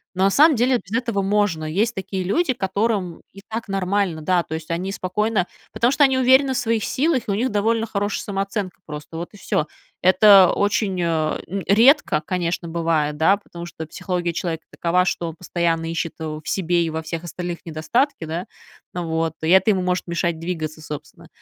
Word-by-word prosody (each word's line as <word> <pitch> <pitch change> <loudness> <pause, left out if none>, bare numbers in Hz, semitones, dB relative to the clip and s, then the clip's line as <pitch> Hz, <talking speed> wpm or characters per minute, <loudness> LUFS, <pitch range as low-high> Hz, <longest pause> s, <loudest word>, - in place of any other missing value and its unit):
Но, 185 - +1
на 195 - +5
самом 300 +6 +6
деле, 250 +2 +3
без 210 +5 -1
этого 230 -5 -1
можно. 195 -5 +1
Есть 200 +9 0
такие 190 0 -3
люди, 260 - +1
которым 195 -3 -1
и 195 - -13
так 225 +1 -5
нормально. 195 -3 -1
Да, 180 +1 +2
то 160 - -5
есть 160 0 -7
они 180 +3 -2
спокойно- 200 +1 0 0.3
потому 240 +2 +2
что 290 - +3
они 265 -2 +4
уверены 260 +1 +4
в - - -2
своих 225 -2 0
силах,- 275 -2 +1
и - - 0
у - - +1
них 250 +5 0
довольно 225 +2 +1
хорошая 205 -2 -2
самооценка 195 -1 -3
просто, 150 +1 -8
вот 170 +1 -5
и 205 - -13
всё. 155 -4 -1 0.3
Это 190 0 +7
очень, 205 -2 0
а, 160 -2 0
м, 195 +3 -4
редко, 230 - +5
конечно, 175 -1 -2
бывает, 160 -3 0
да, 165 +6 +4
потому 170 -4 -10
что 160 -1 -7
психология 180 +1 -3
человека 165 -1 -3
такова, 175 +2 +1
что 175 -1 -1
он 160 - -9
постоянно 165 -1 -1
ищет, 165 -1 -3
э, - - -5 0.2
в - - -16
себе 175 -2 +1
и - - -2
во 160 0 -3
всех 165 +1 -5
остальных 175 0 -5
недостатки, 165 - -1
да? 165 +4 -4 0.5
Вот 165 -2 -2
и 160 - 0
это 190 +3 +5
ему 190 -2 +1
может 180 0 -1
мешать 170 -1 -1
двигаться, 160 -2 -4
собственно. 150 -1 -9
185 Hz, 195 wpm, -22 LUFS, 165-210 Hz, 0.5 s, Это